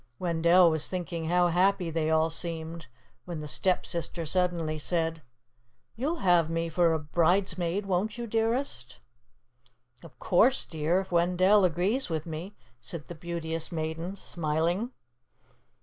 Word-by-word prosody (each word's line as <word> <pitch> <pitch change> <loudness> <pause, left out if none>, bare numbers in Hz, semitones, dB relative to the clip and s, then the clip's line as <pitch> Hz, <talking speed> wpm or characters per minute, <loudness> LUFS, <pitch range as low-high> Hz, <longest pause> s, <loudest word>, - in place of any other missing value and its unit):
Wendell 170 0 +4
was 160 -1 -1
thinking 175 -3 -4
how 175 +1 +3
happy 180 0 +2
they 160 -1 0
all 160 0 +2
seemed, 165 -1 -5 0.4
when 175 -3 -5
the 150 - -6
Stepsister 170 0 -1
suddenly 170 -2 0
said, 165 0 -1 0.7
"You'll 295 +9 -2
have 175 -3 +4
me 165 0 -1
for 165 0 +2
bridesmaid, 175 +4 0
won't 195 +4 -1
you, 240 - -4
dearest?" 225 - -1 1.1
"Of 145 -7 -14
course, 225 - +3
dear, 160 +3 0
if 190 - -11
Wendell 180 +3 +4
agrees 185 +10 0
with 160 -2 -2
me," 170 +5 -6 0.2
said 150 +5 -7
the - - -5
Beauteous 165 -1 -4
Maiden, 165 +3 -4
smiling. 170 +5 -1
170 Hz, 130 wpm, -28 LUFS, 160-185 Hz, 1.1 s, Wendell